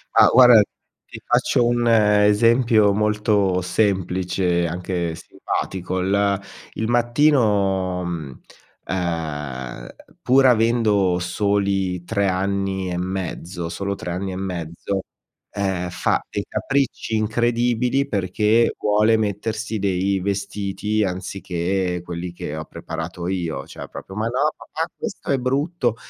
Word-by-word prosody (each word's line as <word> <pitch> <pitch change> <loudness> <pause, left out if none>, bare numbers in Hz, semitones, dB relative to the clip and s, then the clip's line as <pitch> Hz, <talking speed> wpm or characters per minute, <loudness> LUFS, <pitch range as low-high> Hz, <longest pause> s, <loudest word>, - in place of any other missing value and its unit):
Ah, - - +8
guarda, 125 -3 +8 0.4
ti - - -10
faccio 120 - +2
un 120 0 +1
esempio 105 +1 +4
molto 105 -3 +1
semplice, 90 -2 0
anche 85 -1 -3
simpatico: 90 +2 -4
il 100 +1 +1 0.3
il 110 - -2
mattino, 110 -8 +2
mhmm, 80 -7 -6 0.4
ehm, 75 -9 -4 0.3
pur 135 +2 +4
avendo 110 -6 +3
soli 95 0 0
3 100 +1 0
anni 95 0 -1
e 90 - -2
mezzo 90 -2 -4
solo 100 +3 -3
3 90 - -6
anni 95 +2 -3
e - - -5
mezzo, 90 0 -4 0.5
ehm, 95 -3 -2
fa 90 - 0
dei - - -3
capricci 135 -4 -1
incredibili 120 +4 +1
perché 105 +2 +2
vuole 105 +2 +3
mettersi 110 +1 -2
dei 95 0 0
vestiti, 100 +2 -2
anziché 90 -1 -2
quelli 85 0 -5
che 75 -3 -6
ho 80 0 -5
preparato 85 0 -6
io. 85 -7 -3
Cioè - - -9
proprio: 95 - -9
"Ma 110 +2 -1
no, 135 +6 +1
papà, 160 +2 -4
questo - - -5
è 135 - +3
brutto". 135 0 0
100 Hz, 115 wpm, -22 LUFS, 90-110 Hz, 0.5 s, Ah